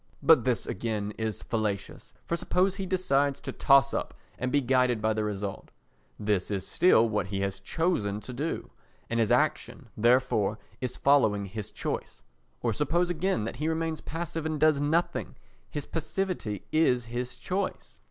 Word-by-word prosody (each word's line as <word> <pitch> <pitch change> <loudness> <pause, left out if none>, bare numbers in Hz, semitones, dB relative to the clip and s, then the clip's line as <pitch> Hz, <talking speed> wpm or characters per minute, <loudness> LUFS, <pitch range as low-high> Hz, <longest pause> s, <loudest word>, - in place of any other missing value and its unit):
But - - +6
this - - +1
again 105 0 -2
is 110 -3 -3
fallacious. 105 -4 -3
For 170 - -1
suppose 185 +3 +1
he 195 -2 -3
decides 145 -7 +1
to - - -5
toss 135 -1 +4
up - - -3 0.2
and 125 0 -1
be 145 - +4
guided 125 -3 +2
by 110 +1 +1
the 110 0 -1
result, 100 -2 -4 0.5
this 105 -3 0
is 95 -2 -2
still 115 -11 +5
what 105 -4 -1
he 95 0 -3
has 95 -1 -2
chosen 105 - 0
to 125 - -8
do, 150 +7 -3 0.4
and 115 - +1
his 110 -3 +2
action, - - 0
therefore, 115 -3 +3 0.2
is 125 -1 -3
following 110 -8 +3
his 105 +1 -6
choice. - - -5 0.4
Or 115 -2 +1
suppose, 170 - +1
again, 175 - 0
that 115 +2 -4
he 150 +3 -1
remains 160 0 -1
passive 165 0 -4
and 155 -1 -2
does 155 -2 +4
nothing—his 150 -1 -2
passivity 165 - -3
is 125 -7 +3
his 120 +2 -4
choice. 190 +1 -4
125 Hz, 160 wpm, -28 LUFS, 105-160 Hz, 0.5 s, But